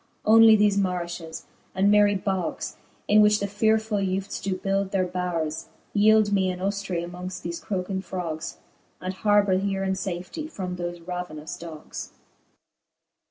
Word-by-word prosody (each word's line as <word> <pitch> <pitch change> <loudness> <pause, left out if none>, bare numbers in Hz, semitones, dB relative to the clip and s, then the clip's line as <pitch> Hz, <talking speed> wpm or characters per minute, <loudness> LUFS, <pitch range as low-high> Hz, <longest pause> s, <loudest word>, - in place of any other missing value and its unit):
Onely 225 0 +8
thefe 205 -1 +3
marifhes 175 -3 -3 0.3
and 195 +2 +4
myrie 205 -1 +5
bogs, 190 -1 -2 0.3
In 210 +1 +6
which 210 0 +5
the 200 - -1
fearefull 215 +1 +1
ewftes 190 +1 -2
do 195 -1 -1
build 195 +1 -1
their 190 -2 +1
bowres, 175 -4 -3 0.3
Yeeld 215 0 +5
me 190 -2 +2
an 180 - -3
hoftry 190 -2 -2
mongft 180 +1 -7
the 170 - -3
croking 190 -1 -2
frogs, 170 -3 -5 0.4
And 185 +1 -4
harbour 205 -1 +3
here 195 0 -1
in 190 0 0
fafety 190 - -5
from 185 - -4
thoie 175 -1 -6
ravenous 175 -4 -5
dogs. 160 -2 -8
190 Hz, 145 wpm, -25 LUFS, 180-205 Hz, 0.4 s, Onely